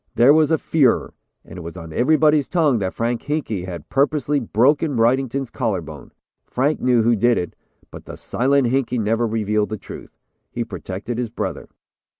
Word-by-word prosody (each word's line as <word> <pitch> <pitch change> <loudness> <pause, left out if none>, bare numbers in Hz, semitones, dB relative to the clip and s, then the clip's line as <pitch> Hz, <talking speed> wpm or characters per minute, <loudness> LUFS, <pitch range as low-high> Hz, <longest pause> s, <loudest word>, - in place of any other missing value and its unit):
There 125 +5 +6
was 155 -1 +4
a 160 - +3
furor. 145 -5 +1 0.3
It 90 +1 -10
was 85 +2 -8
on 80 -2 -9
everybody's 150 - +3
tongue 155 -9 +2
that 95 -2 -3
Frank 115 +1 -1
Hinkey 125 - -2
had 85 -4 -8
purposely 145 +1 +1
broken 135 +5 +1
Wrightington's 130 +2 +1
collar 110 -8 -1
bone. 80 -2 -11 0.4
Frank 140 +5 0
knew 125 -2 +3
who 120 +1 +3
did 120 +3 +2
it, 90 - -4 0.4
but - - -11
the - - -8
'Silent 135 +2 +1
Hinkey' 125 -1 0
never 115 +1 0
revealed 105 -1 0
the 110 - -3
real - - -11
truth. - - -11 0.3
He 120 - -3
protected 105 +1 -6
his 120 -2 -2
brother. 115 - -5
120 Hz, 175 wpm, -21 LUFS, 105-140 Hz, 0.4 s, There